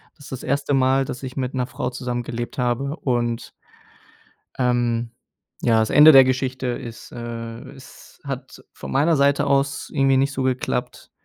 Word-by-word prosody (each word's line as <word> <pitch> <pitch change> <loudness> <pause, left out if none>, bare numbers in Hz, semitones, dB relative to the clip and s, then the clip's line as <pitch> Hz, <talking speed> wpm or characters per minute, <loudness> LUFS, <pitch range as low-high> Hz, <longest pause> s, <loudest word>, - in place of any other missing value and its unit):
Das 145 - -15
ist - - -12
das 130 - -6
1. 140 +1 -1
Mal, 135 +1 +3
dass 125 +1 -7
ich 130 -1 -6
mit 130 -1 -2
'ner 125 -1 0
Frau 125 - -3
zusammengelebt 120 -1 -4
habe 125 +4 -1
und 120 -5 -2 1.1
ähm, 120 -2 0 0.5
ja, 115 -2 +3
das 110 - 0
Ende 150 +2 +8
der 135 -2 +9
Geschichte 130 0 -1
ist, 120 -2 -6
äh, 115 -1 -6
es - - -16
hat - - -7
von - - -8
meiner 155 +5 +3
Seite 140 +1 +3
aus 140 0 0
irgendwie 135 -2 +3
nicht 135 +2 +2
so 135 - -3
geklappt. 130 -1 -2
130 Hz, 165 wpm, -22 LUFS, 120-140 Hz, 1.1 s, der